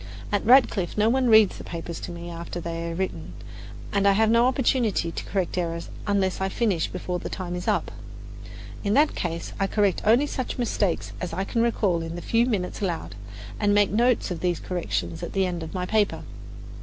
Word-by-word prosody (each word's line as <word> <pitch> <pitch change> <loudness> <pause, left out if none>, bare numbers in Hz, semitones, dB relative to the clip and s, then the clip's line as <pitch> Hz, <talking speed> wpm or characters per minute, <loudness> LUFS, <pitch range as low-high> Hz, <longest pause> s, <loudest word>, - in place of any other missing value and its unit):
At 205 -1 +1
Radcliffe 225 -8 +4
no 215 +1 +4
one 255 0 +2
reads 220 -3 +6
the - - -7
papers 170 -1 -6
to - - -6
me 170 0 -7
after 170 +1 -6
they 170 0 -4
are 165 - -4
written, 190 +1 -4 0.6
and 200 0 +2
I 200 - +6
have 220 +2 +3
no 235 +2 +5
opportunity 240 -9 +1
to - - -6
correct 185 -2 -1
errors 170 -1 -3 0.2
unless 195 -2 +1
I 190 - 0
finish 190 -6 0
before 180 -1 -4
the - - -6
time 180 -2 -5
is 180 - -5
up. - - +1 0.9
In 205 +1 +1
that 295 +2 +4
case 170 -1 -4
I 195 - +2
correct 200 -2 +1
only 235 +7 +4
such 260 -3 -4
mistakes 210 -7 -1
as 180 -2 -4
I 190 +3 -1
can 230 +4 -1
recall 205 -7 +1
in 165 0 -5
the 175 - -5
few 235 +1 +2
minutes 200 -4 -2
allowed, 165 - -3 0.5
and 205 0 +3
make 205 -1 +4
notes 235 0 +2
of 175 - -3
these 175 -1 0
corrections 175 -2 -3
at 170 - -5
the 195 -1 +2
end 175 -2 -3
of 160 +3 -7
my 180 -1 -1
paper. 210 +1 +1
190 Hz, 205 wpm, -25 LUFS, 175-220 Hz, 0.9 s, reads